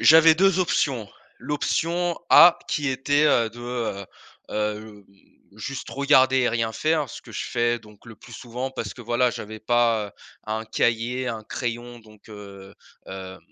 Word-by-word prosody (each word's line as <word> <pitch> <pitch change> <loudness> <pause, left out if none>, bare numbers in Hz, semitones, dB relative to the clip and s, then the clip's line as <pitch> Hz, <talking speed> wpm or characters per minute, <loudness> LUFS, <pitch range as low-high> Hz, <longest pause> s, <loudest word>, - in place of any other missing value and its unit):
j'avais 160 0 +7
2 190 +1 +3
options. 130 - 0 0.3
L'option 165 +5 -1
A 175 0 +8
qui 145 -2 -1
était, 145 +3 +1
heu, 120 -6 +3
de 120 +2 -12
heu, 115 -5 -4 0.4
hem, 105 -1 -4 0.5
juste 130 +5 -6
regarder 130 -1 +4
et 125 -2 +2
rien 115 -1 -1
faire, 155 -1 0
ce - - -10
que - - -14
je - - -4
fais 120 0 0
donc 105 -2 -19
le 115 - -12
plus 120 - -15
souvent 125 +3 -5
parce 115 -6 -5
que, 120 - -11
voilà, 120 +2 +1
j'avais 110 0 -8
pas, 115 -2 +2
heu, - - -18 0.3
un 110 +1 -3
cahier, 120 +3 -1
un 115 -2 -5
crayon 120 0 -5
donc, 110 -1 -19
heu, 100 -2 -11 0.3
hem 95 -1 -8
120 Hz, 165 wpm, -24 LUFS, 110-135 Hz, 0.5 s, A